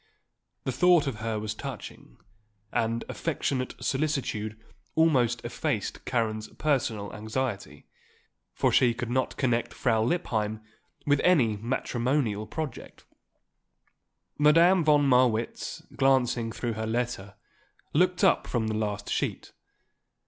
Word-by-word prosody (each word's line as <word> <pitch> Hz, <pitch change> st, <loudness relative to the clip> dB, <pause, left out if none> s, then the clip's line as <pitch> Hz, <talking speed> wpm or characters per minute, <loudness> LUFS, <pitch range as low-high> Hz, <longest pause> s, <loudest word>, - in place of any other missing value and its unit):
The 130 Hz, -, -1 dB
thought 175 Hz, +3 st, +4 dB
of 135 Hz, -5 st, -3 dB
her 110 Hz, 0 st, -2 dB
was 105 Hz, 0 st, -3 dB
touching, -, -, -9 dB, 0.5 s
and 115 Hz, 0 st, -1 dB
affectionate 135 Hz, -5 st, -2 dB
solicitude 135 Hz, -7 st, -2 dB, 0.4 s
almost 125 Hz, -8 st, +2 dB
effaced -, -, -3 dB
Karen's 110 Hz, -3 st, -1 dB
personal 120 Hz, -9 st, -1 dB
anxiety; 110 Hz, 0 st, -4 dB, 0.7 s
for -, -, +2 dB
she 120 Hz, -2 st, +4 dB
could 120 Hz, -1 st, -4 dB
not 130 Hz, 0 st, -1 dB
connect 120 Hz, -3 st, 0 dB
Frau 115 Hz, -3 st, +1 dB
Lippheim 110 Hz, -6 st, -1 dB, 0.4 s
with 145 Hz, -1 st, +3 dB
any 130 Hz, -12 st, +4 dB
matrimonial 120 Hz, 0 st, -1 dB
project. 150 Hz, +1 st, -6 dB, 1.3 s
Madame 165 Hz, +4 st, +5 dB
von 145 Hz, -2 st, +4 dB
Marwitz, 125 Hz, -3 st, +1 dB
glancing 125 Hz, -4 st, +2 dB
through 120 Hz, 0 st, -3 dB
her 110 Hz, 0 st, -4 dB
letter, 110 Hz, -4 st, -3 dB, 0.6 s
looked 180 Hz, +4 st, +2 dB
up 190 Hz, -, +4 dB
from 110 Hz, -3 st, -1 dB
the -, -, -1 dB
last 105 Hz, -2 st, -2 dB
sheet. -, -, -2 dB
120 Hz, 110 wpm, -27 LUFS, 110-145 Hz, 1.3 s, Madame